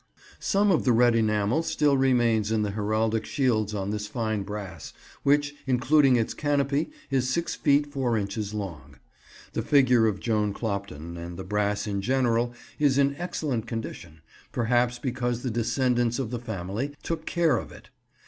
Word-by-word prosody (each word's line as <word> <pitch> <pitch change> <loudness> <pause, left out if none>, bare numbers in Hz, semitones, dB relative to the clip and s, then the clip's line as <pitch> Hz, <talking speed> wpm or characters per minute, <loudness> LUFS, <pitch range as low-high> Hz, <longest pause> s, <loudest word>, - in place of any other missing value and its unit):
Some 205 0 +2
of 165 - +2
the 125 - +3
red 120 +1 +5
enamel 110 +4 +2
still 150 -3 +2
remains 120 -5 +2
in 110 -1 +2
the 105 - -1
heraldic 110 +2 0
shields 110 -7 0
on 100 0 -2
this 105 0 -3
fine 110 -2 -2
brass, 95 -5 -7 0.3
which, 145 +1 +2
including 135 +2 +4
its 115 -2 0
canopy, 145 0 0 0.2
is 130 -2 +1
six 170 +6 -1
feet 145 0 +3
four 135 -5 -1
inches 100 0 -3
long. 100 -7 -6 0.6
The - - -1
figure 125 -5 +4
of 100 -2 -1
Joan 105 -3 0
Clopton, 100 -7 -4
and 85 +1 -7
the 95 - -5
brass 105 +2 -1
in 100 -2 -2
general, 120 0 +1 0.3
is 140 -3 +3
in 140 0 +3
excellent 145 -9 -3
condition, 85 -8 -6 0.3
perhaps 120 +1 +1
because 120 -2 -2
the 130 - -1
descendants 120 +1 +1
of 125 -4 -3
the 120 - -3
family 110 +5 -4
took 160 -1 -4
care 165 -7 +2
of - - -6
it. - - -15
120 Hz, 165 wpm, -26 LUFS, 105-135 Hz, 0.6 s, red